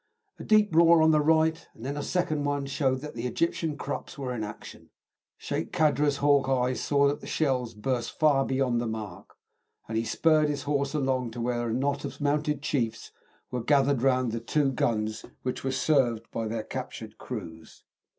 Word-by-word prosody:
A - - -7
deep 215 -4 +3
roar 170 -1 +6
on 160 - +5
the 155 -1 +4
right, 160 +1 +2
and 115 - -10
then 140 +2 -3
a 145 - -3
second 155 -3 -1
one 145 -1 -1
showed 135 -1 0
that 150 +1 -7
the 120 +1 -3
Egyptian 160 +2 -1
Krupps 145 - -5
were 130 -3 -3
in 110 -3 -3
action. 105 0 -9 0.5
Sheik - - -4
Kadra's 150 -2 +2
hawk 140 -2 +3
eyes 125 -1 +1
saw 140 -1 +3
that 145 +1 -1
the - - -9
shells 125 -6 0
burst 120 +2 -3
far 145 -3 +4
beyond 130 -3 0
the 120 - -2
mark, 110 -5 -7 0.5
and 110 - -5
he 110 - +1
spurred 155 +6 +3
his 145 -2 -3
horse 140 0 -1
along 130 -4 0
to 120 - -7
where 120 0 -1
a - - -1
knot 140 +2 -1
of - - -6
mounted 150 0 0
chiefs 115 -7 -2 0.4
were 125 -1 -2
gathered 140 -1 +3
round 130 -2 +2
the 115 - -2
two 135 +4 +1
guns, 110 -4 -1 0.2
which 125 - -3
were 135 - -1
served 130 -5 +1
by 115 -1 -3
their 110 0 -3
captured - - -7
crews. 80 0 -8
135 Hz, 190 wpm, -27 LUFS, 120-150 Hz, 0.5 s, roar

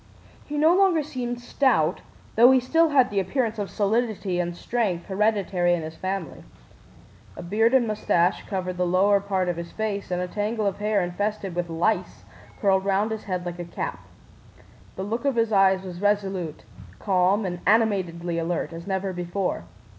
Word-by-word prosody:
He 295 - -4
no 320 +4 +5
longer 370 -5 +3
seemed 245 -4 -4
stout, 240 - +1 0.3
though 235 +3 +7
he 265 0 +6
still 325 +6 +2
had 265 -6 +3
the 200 - +1
appearance 225 +3 -1
of 200 - -3
solidity 210 -3 0
and 175 0 -2
strength 200 -8 -1
hereditary 195 -3 +1
in 165 - -4
his 160 +1 -7
family. 185 -1 -4 0.9
A - - -7
beard 220 +7 +2
and 255 -2 +4
mustache 185 -5 +1
covered 185 -3 -3
the 180 0 +1
lower 195 +3 +4
part 195 -2 -1
of 175 -1 -1
his 170 0 -6
face, 210 -2 -3
and 180 -1 -1
a 180 - -2
tangle 210 +3 -2
of 200 -1 -1
hair, 210 -2 +1
infested 195 +2 -3
with 175 0 -3
lice, 165 +7 -1 0.4
curled 190 -2 +2
round 200 +3 +1
his 220 -1 -5
head 180 -2 -3
like 175 0 -5
a - - -3
cap. 170 - -5 1.0
The 190 - -4
look 225 +6 -3
of 280 -3 +1
his 230 -1 +1
eyes 190 -2 +4
was 180 -1 -8
resolute, 195 -6 -1 0.3
calm, 195 +1 +2
and 175 -1 -3
animatedly 180 -6 +1
alert, 165 0 -2
as 165 +2 -9
never 190 -1 -2
before. 175 - -3
195 Hz, 175 wpm, -25 LUFS, 180-220 Hz, 1.0 s, though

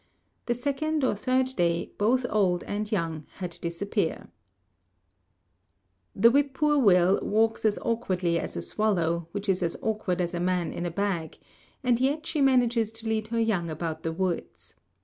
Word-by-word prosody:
The 240 - +1
second 285 +4 -1
or 260 - +3
third 255 +5 +1
day 170 -1 0
both 245 +5 +2
old 185 -4 +2
and 210 +1 -4
young 165 -6 -2
had 180 -3 -6
disappeared. 170 +1 -2 1.9
The 230 +4 +6
whippoorwill 265 - +3
walks 225 +2 +1
as 210 -1 +3
awkwardly 185 -7 0
as - - -5
a - - -3
swallow, 170 -6 0
which 205 +2 -5
is 190 -1 +1
as 170 -1 -1
awkward 210 -5 -1
as 175 0 -1
a 175 - -2
man 180 -1 0
in 175 - -3
a - - -2
bag, 175 -3 -2 0.5
and 245 -2 +2
yet 285 +5 0
she 305 - -1
manages 240 -4 +3
to 225 0 -7
lead 220 -1 -1
her 230 +1 -1
young 200 -7 0
about 160 0 -4
the 165 - -2
woods. 180 0 -3
205 Hz, 160 wpm, -27 LUFS, 175-235 Hz, 1.9 s, The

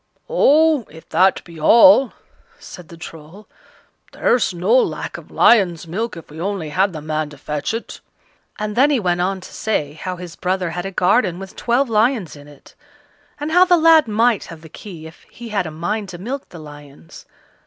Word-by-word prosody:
"Oh! 315 - +3
if 160 +2 -15
that 185 +4 +2
be 170 -2 -13
all," 265 - +6 0.4
said 180 -3 -12
the 170 - -12
Troll, 165 +5 -12 0.7
"there's 245 - +1
no 180 +5 -1
lack 260 - 0
of - - -10
lion's 185 -8 +3
milk, 195 +5 -4
if 165 - -12
we 160 +2 -9
only 190 -4 -3
had 190 +6 +1
the 155 -3 -8
man 155 -1 -3
to 145 - -13
fetch 150 +1 -4
it;" 230 +1 -6 0.6
and 210 0 -4
then 270 +5 +4
he 285 -4 +2
went 175 -3 0
on 190 +1 -2
to - - -12
say 150 -10 -2
how 180 +4 -6
his 175 -2 -10
brother 185 -1 -2
had 175 +3 -4
a - - -6
garden 185 0 +1
with 195 0 -10
twelve 245 +3 0
lions 220 - 0
in 145 0 -14
it, 145 -2 -18 0.7
and 295 +2 -4
how 355 +2 +6
the 360 -1 +4
lad 320 -3 +5
might 225 +1 +1
have 165 -2 -11
the 160 - -13
key 170 -2 -11
if 160 +1 -13
he 240 -1 -10
had 200 -5 -1
a - - -7
mind 180 +6 -4
to 175 - -8
milk 255 +9 -6
the 175 - -12
lions. 145 - -13
185 Hz, 195 wpm, -19 LUFS, 160-230 Hz, 0.7 s, all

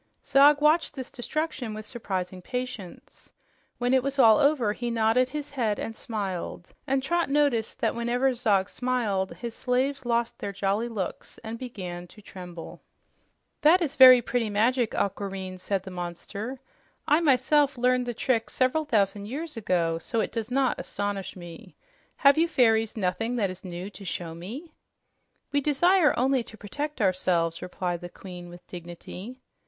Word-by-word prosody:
Zog 285 +2 +6
watched 310 +3 +3
this 260 -1 -7
destruction 260 -3 -3
with 215 0 -7
surprising 185 -6 -4
patience. 250 -4 -7 0.5
When 245 +1 +1
it 260 - +5
was 275 +2 -3
all 225 -5 +7
over, 280 -8 +3
he 240 +2 -4
nodded 230 +2 +2
his 295 +1 -5
head 225 -7 0
and 225 - -5
smiled, 190 -6 -5
and 265 0 +1
Trot 340 +3 0
noticed 275 -6 +1
that - - +2
whenever 245 +3 +1
Zog 210 -6 +2
smiled, 220 -7 -1
his 235 -2 -6
slaves 260 +3 -1
lost 235 -1 -1
their 200 - -4
jolly 200 +3 -1
looks 200 -6 -5
and 225 +1 -6
began 180 -8 -6
to 210 - -16
tremble. 180 -4 -10 0.8
"That 325 +5 +6
is 315 -6 -2
very 255 -2 +9
pretty 235 -2 -1
magic, 230 +3 +1
Aquareine," 190 -2 -3
said 195 0 -2
the 190 - -8
monster. 190 +8 -6 0.5
"I 300 - +5
myself 285 -1 +3
learned 250 0 +2
the 240 - -3
trick 230 -1 0
several 265 +5 +1
thousand 205 -5 +1
years 300 +6 -5
ago, 170 -6 0
so 230 +6 -2
it - - -1
does 230 -1 -4
not 265 0 +1
astonish 205 -1 -4
me. 175 -2 -11 0.4
Have 280 +2 +5
you 335 - +4
fairies 225 -7 +2
nothing 220 +5 -1
that 200 -6 0
is 185 0 -11
new 180 +2 -6
to 200 - -11
show 170 -3 -4
me?" 240 - -8 0.8
"We 285 - +2
desire 310 +4 +3
only 260 +1 +2
to 220 - -12
protect 290 +9 -4
ourselves," 180 -3 +1
replied 180 -1 -3
the 175 - -7
Queen 180 -1 -10
with 175 +1 -13
dignity. 180 +6 -9
230 Hz, 160 wpm, -27 LUFS, 190-265 Hz, 0.8 s, very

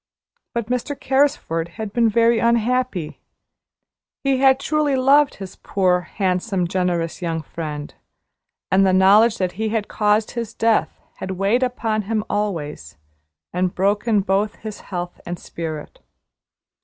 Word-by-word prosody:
But 235 -2 -1
Mr. 250 +4 -3
Carrisford 265 - 0
had 215 -2 -5
been 235 -2 +3
very 230 +1 +3
unhappy. 235 -6 0 1.0
He 275 -1 +2
had 265 0 +4
truly 295 0 +1
loved 275 +2 +4
his 195 -2 -9
poor, 185 -2 +1 0.2
handsome, 185 -1 0
generous 175 -2 -1
young 165 -2 -2
friend, 150 -2 -6 0.8
and 190 +1 +5
the 190 -1 +3
knowledge 205 +5 +5
that 185 -2 -1
he 220 +4 -2
had 220 -1 -1
caused 210 0 +1
his 230 -2 -5
death 225 -1 +1 0.2
had 190 - -6
weighed 200 +6 +2
upon 230 -4 0
him 220 -2 0
always, 150 - -3 0.6
and 180 0 0
broken 205 +3 +2
both 200 +3 0
his 215 -2 -8
health 175 -2 -6
and 175 0 -5
spirit. 160 -3 -7
210 Hz, 135 wpm, -21 LUFS, 180-235 Hz, 1.0 s, and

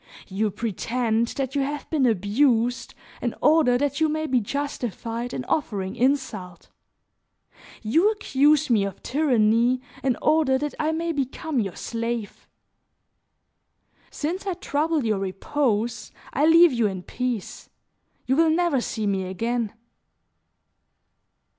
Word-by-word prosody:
You 210 +3 0
pretend 230 +2 -1
that 270 -1 -2
you 285 - +1
have 290 +2 -3
been 285 -5 +3
abused 230 +4 +1 0.3
in - - -2
order 300 -5 +4
that 285 +2 -1
you 315 - +4
may 310 +1 -1
be 255 -4 +2
justified 240 -2 -4
in 255 - -4
offering 200 -12 -2
insult; 230 -10 -1 1.1
you 325 - +3
accuse 300 -7 +2
me 215 -4 +4
of 195 -1 -6
tyranny 245 -3 +2 0.2
in 260 -3 +1
order 305 -4 +3
that 295 +2 -3
I 310 0 +1
may 330 +1 -1
become 285 0 -2
your 195 -6 -2
slave. 230 -2 -4 1.6
Since 355 +6 -4
I 375 - -1
trouble 305 -2 -1
your 215 -3 +1
repose, 220 +4 -1 0.2
I 295 +3 +3
leave 335 -1 +7
you 235 -3 +2
in 190 -2 -5
peace; 245 -3 -4 0.6
you 260 - +1
will 325 +2 +4
never 325 -5 +2
see 220 -2 -3
me 195 -2 0
again." 230 +4 -2
250 Hz, 130 wpm, -24 LUFS, 220-295 Hz, 1.6 s, leave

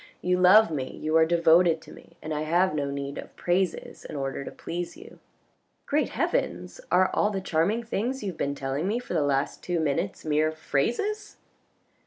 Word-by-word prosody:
You 180 0 +2
love 195 +3 +7
me, 135 -4 -4
you 155 +1 -1
are 160 0 +5
devoted 170 0 +4
to - - -14
me, - - -16
and 155 - -3
I 150 - -2
have 175 +3 +2
no 145 -2 -1
need 140 0 -4
of - - -10
praises 180 0 -1
in - - -8
order 135 0 -3
to - - -6
please 175 +1 -6
you." - - -14 0.3
" - - -46
Great 295 +1 +1
heavens! - - -2
are 185 0 +4
all 210 - +2
the 200 -2 -2
charming 190 +6 0
things 235 +3 -2
you 195 - -2
have 165 - -15
been 140 0 -1
telling 140 +5 -2
me 215 +4 0
for 245 - -6
the 165 - +2
last 140 -1 0
two 175 -2 -1
minutes 160 +5 -1
mere 155 0 +2
phrases 240 - -2
170 Hz, 200 wpm, -26 LUFS, 150-195 Hz, 0.3 s, love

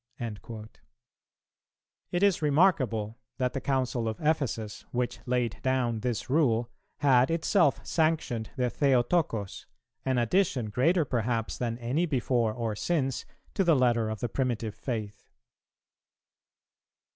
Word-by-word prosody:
"[302:2] 110 -1 -6 1.4
It 175 +2 0
is 200 -4 +3
remarkable 140 - +2 0.2
that 125 -1 0
the 135 - -3
Council 130 -3 0
of 110 - -3
Ephesus, 135 -9 -1
which 125 0 -2
laid 125 -2 0
down 125 -3 0
this 120 -1 -2
rule, 120 -5 +2 0.3
had 130 -3 +5
itself 165 -1 +2
sanctioned 155 -9 0
the 125 -3 0
Theotocos, 125 - +1 0.4
an 130 -1 0
addition, 120 - +1
greater 160 - +2
perhaps 115 -2 -1
than 115 -2 -2
any 130 +9 0
before 125 -5 +1
or 115 -1 -3
since, 135 0 -1 0.3
to 195 - +2
the 170 -3 +4
letter 120 -4 +2
of 110 -1 -5
the 120 - 0
primitive 115 -4 -1
faith. 110 -5 -5
125 Hz, 120 wpm, -28 LUFS, 115-145 Hz, 1.4 s, had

